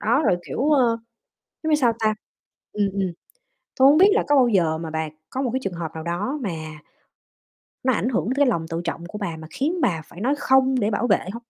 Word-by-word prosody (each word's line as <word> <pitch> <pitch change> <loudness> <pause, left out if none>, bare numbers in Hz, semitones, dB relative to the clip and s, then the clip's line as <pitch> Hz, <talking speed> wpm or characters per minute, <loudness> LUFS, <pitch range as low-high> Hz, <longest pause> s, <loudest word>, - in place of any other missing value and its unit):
đó, 235 +8 +2
rồi, 180 - +3
kiểu, 285 +4 -1
ơ, 245 -6 +3 0.6
giống 315 - -1
như - - +5
sao 250 -5 +3
ta 215 -1 +1 0.6
ừm, 205 -1 +1
ừm. 190 -2 -1 0.6
Tui 265 - +6
hổng 295 - +5
biết 380 +4 +7
là 440 - +2
có 290 - +4
bao 260 -3 +5
giờ 170 -8 +2
mà 160 0 -6
bà 160 0 -3 0.2
có 265 - -3
một 260 - 0
cái 260 - 0
trường 195 - -3
hợp 165 -2 -5
nào 160 0 -6
đó 200 - -2
mà 200 - -2 1.3
nó 260 - +3
ảnh 245 - 0
hưởng 205 -10 -1
tới 255 - 0
cái 285 0 +4
lòng 170 -10 0
tự 165 +1 -3
trọng 170 0 -4
của 210 - -7
bà, 195 -6 -4
mà 155 0 -10
khiến 325 +6 -1
bà 165 - +1
phải 175 - -13
nói 265 +7 +1
"không" 265 -1 +3
để 210 0 +1
bảo 220 +3 0
vệ 205 - +4
hông? 235 +2 -8
220 Hz, 245 wpm, -23 LUFS, 170-265 Hz, 1.3 s, biết